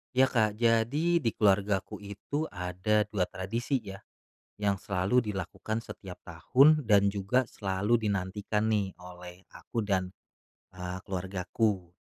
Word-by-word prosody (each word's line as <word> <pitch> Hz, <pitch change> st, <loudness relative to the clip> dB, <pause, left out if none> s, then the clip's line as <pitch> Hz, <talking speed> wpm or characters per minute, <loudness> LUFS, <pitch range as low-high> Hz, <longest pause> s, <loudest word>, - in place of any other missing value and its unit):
Ya, 130 Hz, +1 st, +4 dB
Kak, 110 Hz, -3 st, +2 dB
jadi 120 Hz, +10 st, +2 dB
di 120 Hz, -, -2 dB
keluargaku 100 Hz, -1 st, +1 dB
itu 105 Hz, +10 st, -4 dB
ada 90 Hz, +4 st, 0 dB
2 95 Hz, -4 st, 0 dB
tradisi 115 Hz, +7 st, -2 dB
ya, 95 Hz, -1 st, -8 dB, 0.6 s
yang 100 Hz, -2 st, 0 dB
selalu 105 Hz, +4 st, +1 dB
dilakukan 105 Hz, +2 st, -4 dB
setiap 95 Hz, -5 st, -8 dB
tahun, 135 Hz, -, +4 dB
dan 100 Hz, -1 st, +6 dB
juga 110 Hz, +6 st, +1 dB
selalu 105 Hz, +3 st, 0 dB
dinantikan 100 Hz, +2 st, -1 dB
nih, 105 Hz, -4 st, 0 dB
oleh 90 Hz, +1 st, -11 dB
aku 115 Hz, -3 st, -4 dB
dan, 95 Hz, -2 st, 0 dB, 0.6 s
eee, 90 Hz, 0 st, -5 dB
keluargaku. 95 Hz, 0 st, -2 dB
100 Hz, 125 wpm, -29 LUFS, 95-115 Hz, 0.6 s, dan